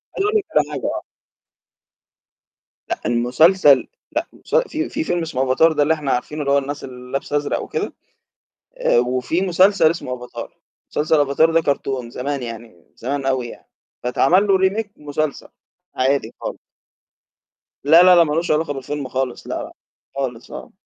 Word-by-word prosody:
عايز 395 - 0
أقول 420 - -1
لِك 410 - -2
على 150 0 +2
حاجة 140 -3 -4
آه. - - -2 1.9
لأ، - - -3
المسلسل 135 +5 +4 0.2
لأ، - - -1
المس - - -6
في 315 +1 -3
في 315 - -2
فيلم 175 - -1
اسمه 145 -5 -1
أفاتار 135 +5 +4
ده 150 - +2
اللي 155 +2 +3
إحنا 150 -4 -2
عارفينه 150 +5 -2
اللي 140 - 0
هو 140 - +5
الناس 140 +1 -3
اللي 125 -1 -10
لابسة 140 +1 -1
أزرق 145 - -2
وكده، - - -4 0.8
آآ 120 - +3
وفي 125 +8 0
مسلسل 185 -2 +4
اسمه 130 -7 -5
أفاتار، 125 0 -9 0.3
مسلسل 155 +1 +2
أفاتار 145 +3 +3
ده 165 0 +3
كرتون 135 -4 -2
زمان 135 +2 -4
يعني، 115 -7 -9
زمان 135 +3 -3
أوي 130 -2 0
يعني. - - -12 0.4
فاتعمل 170 +11 +3
له 195 -1 +4
remake 200 +3 0
مسلسل، 150 0 -3 0.5
عادي 135 +2 0
خالص. - - -5 1.3
لا، 160 +5 +7
لا، 180 0 +7
لأ، 170 - +7
مالوش 165 +2 -1
علاقة 155 -1 +1
بالفيلم 140 +1 -5
خالص 130 -1 -3
لأ، - - -3
لأ، - - -10 0.4
خالص 125 -4 -4
آه. - - -9
145 Hz, 165 wpm, -20 LUFS, 130-165 Hz, 1.9 s, لا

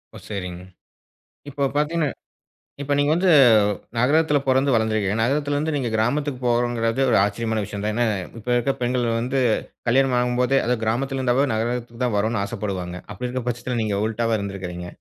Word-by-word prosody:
ஓ! - - -8
சரிங்க. 90 -4 -5 0.9
இப்போ 140 0 -4
பாத்தீங்கன்னா 150 +1 +1 0.8
இப்போ 145 +1 -2
நீங்க 145 +1 +2
வந்து 180 +1 +2 0.7
நகரத்துல 150 +4 +3
பொறந்து 135 +1 +3
வளர்ந்துர்க்குறீங்க. 110 -2 +1
நகரத்துலருந்து, 145 +4 0
நீங்க 125 -4 -1
கிராமத்துக்கு 130 +5 0
போறோங்கிறது 120 0 +1
ஒரு - - +4
ஆச்சரியமான 110 +1 -1
விஷயம் 100 +1 -6
தான். 105 - 0
ஏன்னா, 120 +2 +1 0.3
இப்ப 115 - -11
இருக்க 135 +3 +1
பெண்கள் 125 0 0 0.2
வந்து 130 +3 -1 0.5
கல்யாணம் 130 +2 +3
ஆகும்போதே 125 +2 +2
அது 125 +1 +1
கிராமத்துல 135 +4 -1
இருந்தாவே 130 +2 +2
நகரத்துக்கு 120 +1 -3
தான் 120 - 0
வரணும் 110 +1 0
ஆசப்படுவாங்க. 95 -4 -4 0.2
அப்பிடி 125 +6 -4
இருக்கும் 125 0 -4
பட்சத்துல, 120 +1 -3
நீங்க 105 -2 -1
உல்டாவா 115 0 0
இருந்துருக்குறீங்க. 95 -3 -5
120 Hz, 150 wpm, -23 LUFS, 110-135 Hz, 0.9 s, ஒரு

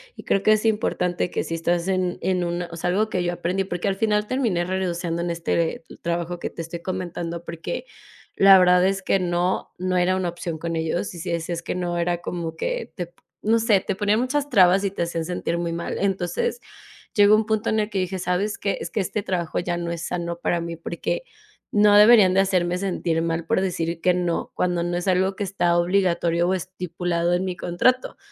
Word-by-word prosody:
y - - -10
creo 195 - +1
que 215 - +5
es 215 +1 0
importante 180 -5 0
que - - -2
si - - -5
estás 170 +2 0
en 185 -2 0
en 185 -1 0
una 175 0 -2
o - - -7
sea, 175 - -1
algo 210 +4 +1
que 180 -3 -1
yo 175 - 0
aprendí, 175 +2 -1
porque 180 0 -3
al 195 - +1
final 210 0 +1
terminé 230 -10 0
renunciando 175 -2 -2
en 175 - -2
este 170 -1 -1 0.2
trabajo 170 +1 -2
que - - -3
te 165 - -7
estoy 170 +1 -7
comentando, 175 -2 -4
porque 170 - -5 0.5
la 195 0 +8
verdad 180 -1 +5
es 195 0 -1
que 195 - +2
no, 175 0 -1
no 185 0 -1
era 180 +1 +2
una 185 -2 -1
opción 170 -1 -5
con 165 +1 -3
ellos. 165 +4 -2
Y 175 - -9
si 175 +2 -4
decías 170 0 -2
que - - -4
no, 175 -1 -2
era 175 0 0
como 165 -2 -4
que, - - -3
te 175 -3 -6 0.3
no 225 +2 +3
sé, 220 -4 +3
te - - -3
ponían 205 +2 +2
muchas 285 +3 -1
trabas 190 -3 +5
y 200 - +1
te 180 - -2
hacían 170 -1 -3
sentir 170 -1 -2
muy 170 -1 -2
mal. 170 0 -4
Entonces 195 - -1 0.6
llegó 205 -1 +7
un 215 0 +1
punto 220 -1 0
en 220 - +1
el 210 0 0
que 205 - -4
dije: 185 +1 -2
"¿Sabes 185 +4 -1
qué? 200 -1 -1
Es 170 - -6
que 210 - -1
este 200 +2 -2
trabajo 175 -5 -2
ya 175 0 -2
no 170 0 -3
es 170 -1 -4
sano 170 -1 -3
para 175 0 0
mí 170 0 -5
porque 170 - -3 0.5
no 210 0 +5
deberían 210 -3 +7
de 195 - +6
hacerme 180 -2 +1
sentir 180 -4 -1
mal 165 0 -2
por 185 - +1
decir 170 -3 -2
que 180 - +3
no 175 -1 -1
cuando 175 -1 0
no 175 0 -1
es 175 - -4
algo 190 +1 +2
que 205 - -3
está 175 -3 +1
obligatorio 175 -1 +2
o 185 - +2
estipulado 175 -2 -2
en 180 +1 +1
mi 185 -1 -3
contrato". 180 +10 +1
180 Hz, 220 wpm, -23 LUFS, 170-195 Hz, 0.6 s, la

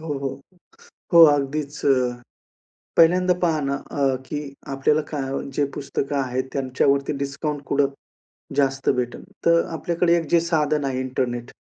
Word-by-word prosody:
हो, 160 - -9
हो. 140 0 -4 0.7
हो, 170 - +10
अगदीच 145 0 0
अ, 125 -3 +2 0.8
पहिल्यांदा 180 +2 +5
पहा 160 -3 +2
ना, 140 0 -1 0.2
अ, 135 -2 +1
की 150 - -3 0.3
आपल्याला 150 +3 +2
काय 140 -3 -3 0.2
जे 145 - +1
पुस्तकं 140 0 -3
आहेत 130 -1 -1
त्यांच्यावरती 140 +1 +1
डिस्काउंट 140 +1 -3
कुठं 140 0 +2 0.7
जास्त 135 -1 +1
भेटेल. 120 -1 -3 0.2
तर 170 0 +5
आपल्याकडे 170 +1 +1
एक 165 -2 -2
जे 170 - +5
साधन 155 -3 0
आहे 130 -1 -1
इंटरनेट. 125 -2 -3
140 Hz, 140 wpm, -23 LUFS, 135-155 Hz, 0.8 s, हो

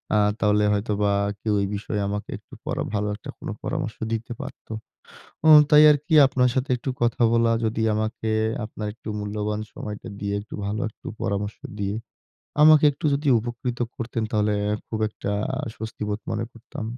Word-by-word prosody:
আ - - +5 0.2
তাহলে 105 0 +3
হয়তোবা 105 0 +1 0.3
কেউ 110 - 0
এ - - +1
বিষয়ে 105 0 -3
আমাকে 105 +1 -4
একটু - - -22
পরা - - -1
ভালো 105 0 0
একটা 105 - -11
কোন - - -8 0.2
পরামর্শ 140 -4 -3 0.2
দিতে 115 +2 -4
পারত। - - -9 0.8
উম 155 -1 +11
তাই 150 0 +8
আরকি 150 +3 -1
আপনার 125 -2 +2
সাথে 130 +1 0
একটু 125 +2 -4
কথা 120 0 +1
বলা 115 0 +4
যদি 110 0 0
আমাকে 110 +1 -2 0.3
আপনার 105 -1 -5
একটু 115 - -11
মূল্যবান 105 +1 -2
সময়টা 105 -1 -6
দিয়ে 100 0 -2
একটু 105 - -11
ভালো 105 +2 -2
একটু - - -17 0.2
পরামর্শ 100 +1 -2 0.2
দিয়ে, 100 +1 -1 0.7
আমাকে 155 -1 +8
একটু 155 +4 -4
যদি 145 +1 -1
উপকৃত 120 +1 -4 0.2
করতেন 115 -1 -3
তাহলে 105 -1 +2 0.3
খুব 110 - -4
একটা 105 -1 -4 0.4
স্বস্তিবোধ 105 -2 -4
মনে 115 +1 -1
করতাম। 115 -1 -8
110 Hz, 165 wpm, -24 LUFS, 105-120 Hz, 0.8 s, উম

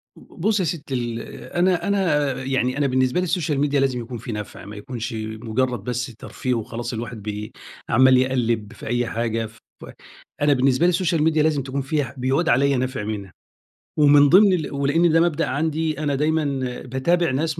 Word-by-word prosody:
ب - - -16 0.2
بُصّي 210 -1 +2
يا - - -1
ستي 145 -4 -4
ال 120 -2 -2 0.3
أنا 175 +1 +1
أنا 160 -9 +1
يعني 130 0 0
أنا 145 - +2
بالنسبة 130 +3 +1
لي - - 0
السوشيال 165 -5 -1
ميديا 145 0 +2
لازم 135 -2 +1
يكون 120 +1 -6
فيه 120 - -7
نفع 105 -2 -7
ما 105 +2 -9
يكونش 115 +2 -6
مجرد 110 +3 -2
بس 125 -1 -3
ترفيه 125 +3 -4
وخلاص 120 +1 -4
الواحد 115 -1 -6
بي 105 +1 -5 0.4
عمال 130 +2 +6
يقلِّب 120 -4 0
في - - -10
أي 120 +1 0
حاجة 115 -1 -2
ف 110 0 -14 0.8
أنا 145 0 +4
بالنسبة 135 +4 +2
لي - - +5
السوشيال 170 -3 +1
ميديا 155 -1 +3
لازم 150 -4 +1
تكون 135 +1 -3
فيها 145 +2 -1
ح 125 - -10
بيعود 135 +7 +1
عليَّ 140 +2 +3
نفع 130 -3 -2
منها، 100 -3 -5 0.6
ومن 145 -1 +6
ضمن 195 +3 +6
ال 160 -5 -2
ولأن 145 +5 +2
ده 165 - +4
مبدأ 165 -2 +1
عندي 155 +2 -1
أنا 145 -2 0
دايمًا 155 +3 +1 0.4
باتابع 155 +6 0
ناس 155 +4 -1
135 Hz, 190 wpm, -22 LUFS, 120-155 Hz, 0.8 s, عمال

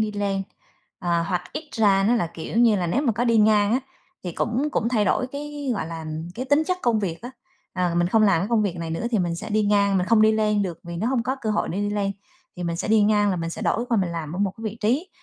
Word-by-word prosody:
đi 215 -1 0
lên, 200 -1 -1 0.6
ờ, 170 -1 0
hoặc 180 +1 -2
ít 310 -1 -6
ra 200 -4 +3
nó 240 - +4
là, 225 -8 +1
kiểu 165 +6 -6
như 230 -3 +5
là, 180 -3 -1
nếu 245 +12 0
mà 245 -6 +2
có 240 +3 -1
đi 230 -1 +3
ngang 210 -1 +4
á, 255 - +2 0.4
thì 175 - -4
cũng 245 - -1
cũng 230 - 0
thay 225 -4 +1
đổi 250 +6 +1
cái 285 +1 -5
gọi 180 -6 -3
là, 165 -1 -6 0.3
cái 250 - -4
tính 285 +4 +3
chất 365 +1 0
công 235 -3 +2
việc 175 -3 -4
á. 245 - -6 0.4
Ờ, 180 -2 0
mình 175 0 +2
không 220 +3 +3
làm 195 -6 +4
cái 195 - -2
công 230 -2 +2
việc 185 -4 -2
này 165 -1 -5
nữa 165 +8 -2
thì 225 - +1
mình 175 -2 0
sẽ - - -7
đi 215 +1 +2
ngang, 200 -1 +3
mình 180 - -1
không 220 0 +4
đi 220 0 +5
lên 210 -1 +1
được 175 -4 -4
vì 170 0 -6
nó 210 +7 -1
hông 255 -2 +1
có 260 +3 -2
cơ 220 - -1
hội 210 - 0
để 180 - -3
đi 205 - -1
lên, 200 -1 -1 0.4
thì 180 - -5
mình 170 -1 -2
sẽ 170 - -3
đi 220 0 +5
ngang 205 -1 +3
là 185 - -1
mình 165 -1 -3
sẽ - - -6
đổi 235 - 0
qua 235 - +2
mình 180 -2 -1
làm 160 -2 -5
ở 180 - -5
một 200 -2 0
cái 225 - -11
vị 215 0 -4
trí, 260 - 0
210 Hz, 300 wpm, -24 LUFS, 180-230 Hz, 0.6 s, như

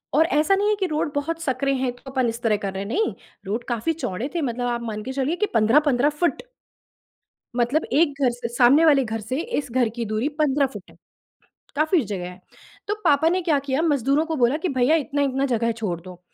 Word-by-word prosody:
और 320 +2 +5
ऐसा 315 +5 +2
नहीं 410 +2 +1
है 425 - +3
कि 380 - +1
रोड 300 -2 -1
बहुत 330 +3 -2
सकरे 275 -1 0
हैं 255 -1 -1
तो 265 +2 -12
अपन 260 -3 +1
इस 230 +1 -6
तरह 215 -3 +2
कर 195 -2 -4
रहे 195 +1 -4
हैं, - - -7
नहीं। 430 - 0 0.3
रोड 220 +5 -3
काफ़ी 240 +8 0
चौड़े 250 - -4
थे 335 - 0
मतलब 245 -2 -2
आप 240 -1 -2
मान 215 -2 -5
के 260 - -5
चलिए 275 +5 -1
कि 420 - 0
15-15 265 +4 +4
फुट। 320 +4 -1 1.2
मतलब 250 +7 +1
एक 285 -2 +2
घर 250 -2 +3
से 240 -1 -5
सामने 270 +7 +5
वाले 280 -4 +5
घर 225 0 -3
से 255 +7 -3 0.2
इस 275 -4 -7
घर 245 -2 +2
की 235 -1 -3
दूरी 215 +6 -1
15 285 -1 +3
फुट 210 -7 -10
है, - - -20 0.8
काफ़ी 310 +2 +3
जगह 185 -3 -5
है। 180 +1 -14 0.5
तो 415 - +1
पापा 310 +1 +4
ने 365 +1 0
क्या 310 -4 +2
किया, 270 +4 0
मज़दूरों 285 -1 +2
को 320 -1 -2
बोला 250 +3 +2
कि, 345 +3 -2
"भैया, 265 +4 +3
इतना-इतना 275 -2 0
जगह 230 +1 +1
छोड़ 175 -6 -2
दो।" 180 0 -12
270 Hz, 225 wpm, -23 LUFS, 235-305 Hz, 1.2 s, और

